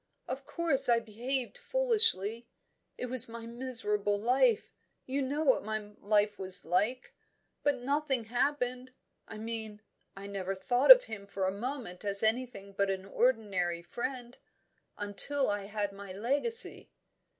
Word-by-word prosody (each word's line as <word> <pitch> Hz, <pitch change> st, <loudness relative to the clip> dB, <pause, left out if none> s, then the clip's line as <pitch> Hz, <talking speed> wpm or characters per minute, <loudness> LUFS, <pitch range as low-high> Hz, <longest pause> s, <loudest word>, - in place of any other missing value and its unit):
Of -, -, -7 dB
course 280 Hz, -7 st, +4 dB
I 235 Hz, -, +4 dB
behaved 240 Hz, -, -4 dB
foolishly. 445 Hz, -, 0 dB, 0.5 s
It -, -, -5 dB
was 250 Hz, -1 st, 0 dB
my 230 Hz, 0 st, -9 dB
miserable 225 Hz, -4 st, 0 dB
life 245 Hz, 0 st, +1 dB, 0.3 s
you 270 Hz, +2 st, -3 dB
know 285 Hz, +4 st, -2 dB
what 270 Hz, -4 st, +2 dB
my 215 Hz, -1 st, -5 dB
life 205 Hz, 0 st, 0 dB
was. 190 Hz, -1 st, +4 dB, 1.0 s
But 285 Hz, -4 st, -1 dB
nothing 275 Hz, -1 st, 0 dB
happened 250 Hz, +1 st, -3 dB, 0.3 s
I -, -, -10 dB
mean, 220 Hz, -1 st, -6 dB, 0.4 s
I 195 Hz, -, -9 dB
never 195 Hz, -1 st, -5 dB
thought 245 Hz, +7 st, -1 dB
of -, -, +10 dB
him 200 Hz, -2 st, -9 dB
for 195 Hz, -1 st, -4 dB
a 190 Hz, -, 0 dB
moment 230 Hz, -3 st, -7 dB
as 200 Hz, 0 st, +7 dB
anything 220 Hz, -3 st, -2 dB
but 200 Hz, 0 st, 0 dB
an 190 Hz, 0 st, -4 dB
ordinary 195 Hz, -7 st, -1 dB
friend 245 Hz, +4 st, -7 dB, 0.6 s
until 205 Hz, +6 st, +3 dB
I 205 Hz, -1 st, -4 dB
had 205 Hz, 0 st, -4 dB
my 200 Hz, -1 st, -10 dB
legacy." 280 Hz, -, +2 dB
230 Hz, 140 wpm, -30 LUFS, 205-260 Hz, 1.0 s, of